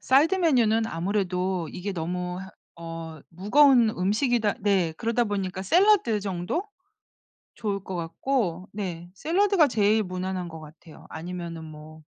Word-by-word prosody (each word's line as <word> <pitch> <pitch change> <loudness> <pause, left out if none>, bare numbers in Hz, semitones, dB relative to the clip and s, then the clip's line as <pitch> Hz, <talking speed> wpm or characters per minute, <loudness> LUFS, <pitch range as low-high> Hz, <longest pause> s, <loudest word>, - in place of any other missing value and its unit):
사이드 290 +8 +4
메뉴는 235 - +3
아무래도 185 -2 -1
이게 190 +2 -4
너무 180 +1 -3
허 190 - -9 0.3
어 165 -1 -7
무거운 235 - +4
음식이다 215 +3 +1
네. 190 -5 +1
그러다 235 +1 0
보니까 195 -3 -3
샐러드 350 - +4
정도? 195 - -3 0.9
좋을 200 -3 -3
것 190 - -6
같고. 180 +1 -2
네. 175 -4 -5
샐러드가 345 - +2
제일 215 -2 +2
무난한 185 -1 -4
것 160 -1 -9
같아요. 155 +1 -14
아니면은 170 -1 -6
뭐 155 0 -11
190 Hz, 290 characters per minute, -26 LUFS, 175-230 Hz, 0.9 s, 사이드